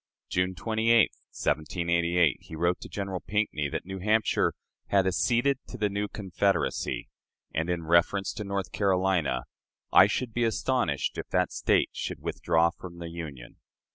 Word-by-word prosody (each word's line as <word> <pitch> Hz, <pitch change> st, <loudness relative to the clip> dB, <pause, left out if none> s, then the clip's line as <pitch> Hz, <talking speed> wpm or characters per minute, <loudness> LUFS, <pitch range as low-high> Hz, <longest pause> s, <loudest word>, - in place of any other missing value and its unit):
June 90 Hz, +1 st, 0 dB
28, 115 Hz, +3 st, +3 dB, 0.2 s
1788, 85 Hz, 0 st, +1 dB
he 80 Hz, -, -10 dB
wrote 85 Hz, +2 st, 0 dB
to -, -, -8 dB
General 95 Hz, -2 st, -3 dB
Pinckney 90 Hz, -10 st, -1 dB
that -, -, -4 dB
New 95 Hz, +1 st, -6 dB
Hampshire 110 Hz, +3 st, +2 dB, 0.3 s
"had 100 Hz, -1 st, +3 dB
acceded 120 Hz, +8 st, +2 dB
to 125 Hz, -, -8 dB
the 105 Hz, -2 st, +1 dB
new 100 Hz, +1 st, -2 dB
Confederacy," 100 Hz, -1 st, -1 dB, 0.5 s
and, 80 Hz, +3 st, -1 dB
in 85 Hz, -2 st, -1 dB
reference 85 Hz, +4 st, +2 dB
to 110 Hz, -, -5 dB
North 100 Hz, -1 st, -3 dB
Carolina, 95 Hz, -9 st, +1 dB, 0.5 s
"I -, -, +9 dB
should 125 Hz, -3 st, -2 dB
be 120 Hz, -, +1 dB
astonished 125 Hz, +3 st, 0 dB
if -, -, -6 dB
that -, -, +1 dB
State -, -, +2 dB
should -, -, -4 dB
withdraw 85 Hz, +1 st, +2 dB
from 85 Hz, -1 st, -11 dB
the 85 Hz, -1 st, -6 dB
Union." 75 Hz, -8 st, -8 dB
95 Hz, 150 wpm, -28 LUFS, 85-105 Hz, 0.5 s, I